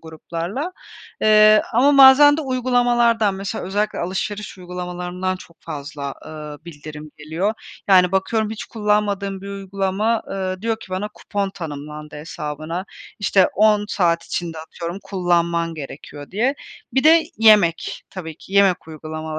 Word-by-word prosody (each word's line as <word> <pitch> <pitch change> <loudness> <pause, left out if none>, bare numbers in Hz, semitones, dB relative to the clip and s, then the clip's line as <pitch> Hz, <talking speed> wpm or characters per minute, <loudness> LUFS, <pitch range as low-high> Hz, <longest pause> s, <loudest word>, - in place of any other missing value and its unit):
gruplarla. 170 - -5 0.5
Eee, 215 0 +6
ama 275 +5 +4
bazen 280 +2 +9
de 315 - -2
uygulamalardan, 240 -5 +2
mesela 195 +3 -4
özellikle 205 +3 -1
alışveriş 195 +3 -4
uygulamalarından 180 +1 -4
çok 170 -2 -16
fazla, 140 -1 -6
ııı, 150 -1 -8
bildirim 155 -2 -10
geliyor. 165 +8 -2 0.3
Yani, 185 -1 +5
bakıyorum 215 +3 0
hiç 220 - -6
kullanmadığım 205 -3 -1
bir 200 - -7
uygulama, 200 +3 -1
ııı, 185 0 -3
diyor 225 -1 0
ki - - -11
bana, 190 +3 -2
"Kupon 200 -1 -3
tanımlandı 150 -3 -8
hesabına," 155 +3 -5 0.3
işte, 195 -2 +4
"10 210 0 +4
saat 170 -5 +1
içinde, 165 -2 -4
atıyorum, 170 +3 -6
kullanman 170 -3 0
gerekiyor." 145 0 -9
diye. 240 +8 +1 0.4
Bir 265 - +2
de 325 +1 +7 0.2
yemek 210 -7 +4
tabii 160 -5 -7
ki. 190 - -15
Yemek 195 -4 +3
uygulamaları, 155 0 -6
190 Hz, 135 wpm, -21 LUFS, 165-215 Hz, 0.5 s, bazen